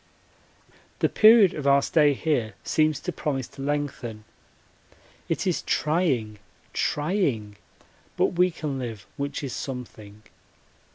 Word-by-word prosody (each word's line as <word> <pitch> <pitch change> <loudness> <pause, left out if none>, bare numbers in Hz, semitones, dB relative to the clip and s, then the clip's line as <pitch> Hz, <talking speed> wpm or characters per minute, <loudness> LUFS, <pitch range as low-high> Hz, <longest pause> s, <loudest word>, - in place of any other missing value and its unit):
The - - +1
period 215 -4 +6
of 145 -2 -4
our 140 0 +5
stay 150 -3 +3
here 130 -8 -1
seems 155 -1 +1
to 180 - -3
promise 135 -7 -3
to - - -11
lengthen. 135 -6 -3 1.1
It - - -1
is - - 0
trying 135 - 0 0.3
trying 145 - -1 0.6
but - - +2
we 180 +1 +3
can 150 -5 -4
live, 115 -5 -6
which 140 0 -4
is 135 - -4
something. 110 -5 -7
140 Hz, 120 wpm, -25 LUFS, 120-155 Hz, 1.1 s, period